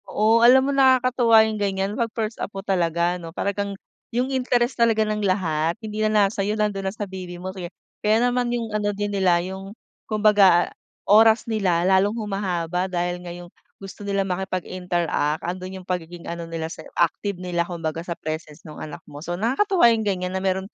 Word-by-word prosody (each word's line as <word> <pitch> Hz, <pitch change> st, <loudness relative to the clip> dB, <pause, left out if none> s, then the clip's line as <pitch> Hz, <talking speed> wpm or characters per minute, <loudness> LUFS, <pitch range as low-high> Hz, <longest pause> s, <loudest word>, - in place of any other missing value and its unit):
Oo 220 Hz, +2 st, +3 dB
alam 255 Hz, +3 st, +7 dB
mo, 280 Hz, -, 0 dB
nakakatuwa 255 Hz, -4 st, +5 dB
yung 215 Hz, -1 st, -3 dB
ganiyan 195 Hz, 0 st, -1 dB
'pag 230 Hz, +1 st, -1 dB
first 220 Hz, 0 st, -3 dB
apo 195 Hz, -1 st, -5 dB
talaga 175 Hz, -1 st, +1 dB
ano, 165 Hz, -, -7 dB
talagang 200 Hz, 0 st, -2 dB, 0.3 s
yung 250 Hz, +3 st, -1 dB
interest 250 Hz, -1 st, +1 dB
talaga 225 Hz, -2 st, +3 dB
ng 215 Hz, 0 st, -1 dB
lahat 170 Hz, -4 st, 0 dB
hindi 215 Hz, -1 st, -5 dB
na 215 Hz, -1 st, +4 dB
nasa 195 Hz, 0 st, -2 dB
sa'yo, 210 Hz, +2 st, -1 dB
nando'n 200 Hz, -2 st, -1 dB
na -, -, -8 dB
sa 210 Hz, -, -4 dB
baby 185 Hz, -2 st, -8 dB
mo 185 Hz, +1 st, -6 dB
sige. 180 Hz, -2 st, -6 dB, 0.3 s
Kaya 215 Hz, +1 st, +3 dB
naman 245 Hz, 0 st, 0 dB
'yung 235 Hz, -2 st, -3 dB
ano 210 Hz, -1 st, 0 dB
din 205 Hz, 0 st, -2 dB
nila 185 Hz, -3 st, +3 dB
'yung 195 Hz, +3 st, -8 dB, 0.3 s
kumbaga 205 Hz, -5 st, +4 dB, 0.3 s
oras 220 Hz, +2 st, +5 dB
nila 190 Hz, -7 st, +1 dB
lalong 195 Hz, +4 st, +3 dB
humahaba 185 Hz, -4 st, -2 dB
dahil 175 Hz, 0 st, -2 dB
ngayong 175 Hz, 0 st, -9 dB, 0.3 s
gusto 195 Hz, +1 st, -10 dB
nila 200 Hz, -1 st, 0 dB
makipag-interact 180 Hz, -4 st, -2 dB
ando'n 185 Hz, +2 st, -5 dB
'yung 180 Hz, -, -20 dB
pagiging 175 Hz, -1 st, -4 dB
ano 170 Hz, 0 st, -6 dB
nila 165 Hz, -1 st, -4 dB
sa 160 Hz, -, -9 dB, 0.2 s
active 185 Hz, +3 st, 0 dB
nila 180 Hz, -1 st, -2 dB
kumbaga 165 Hz, -2 st, -4 dB
sa 170 Hz, 0 st, -5 dB
presence 155 Hz, -1 st, -6 dB
nung 155 Hz, -, -10 dB
anak 155 Hz, -, -7 dB
mo. 145 Hz, 0 st, -11 dB
So, 175 Hz, +2 st, -4 dB
nakakatuwa 275 Hz, -, +2 dB
'yung 225 Hz, -, -1 dB
ganiyan 185 Hz, -2 st, -1 dB
na 190 Hz, -, -2 dB
meron 190 Hz, 0 st, 0 dB
195 Hz, 185 wpm, -23 LUFS, 175-215 Hz, 0.3 s, alam